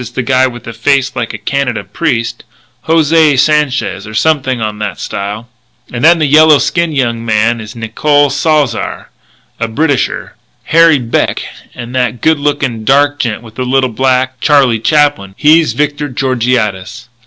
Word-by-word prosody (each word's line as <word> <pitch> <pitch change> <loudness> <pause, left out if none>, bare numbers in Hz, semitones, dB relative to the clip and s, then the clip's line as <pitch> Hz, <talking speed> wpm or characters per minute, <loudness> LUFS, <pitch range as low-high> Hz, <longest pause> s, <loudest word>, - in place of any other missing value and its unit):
Sanchez 120 - -7
is 120 - -25
the 130 - -1
guy 130 +1 +2
with 120 -1 -9
a 115 - -7
face 135 +3 0
like 120 -3 -3
a 110 - -6
Canada 125 0 -2
priest 115 - -3 0.4
José 160 -2 +3
Sanchez 140 -8 0
or 110 - -9
something 130 -1 0
on 105 -1 -4
that 105 -5 -4
style. 105 +4 -5 0.5
And 120 - -4
then 170 +2 +6
the 155 - +1
yellow 155 +1 +5
skinned 170 +1 -1
young 115 -3 -1
man 115 +1 0
is 105 +1 -10
Nicole 145 +6 +1
Salzar; 150 -7 -1 0.5
the 115 - -1
Britisher, 140 +4 -2 0.3
Harry 165 -1 +4
Beck; 120 -3 -1 0.3
and 120 0 -8
that 125 -2 -1
good 160 +2 +1
lookin' 140 -6 -2
dark 145 +4 +2
gent 115 -2 -2
with 110 +1 -13
a - - 0
little 130 0 0
black 130 +1 0
Charlie 135 -5 +3
Chaplin, 145 -6 +1
he's 155 +2 +3
Victor 145 0 -2
Georgiades." 120 -4 -2
130 Hz, 165 wpm, -12 LUFS, 115-145 Hz, 0.5 s, then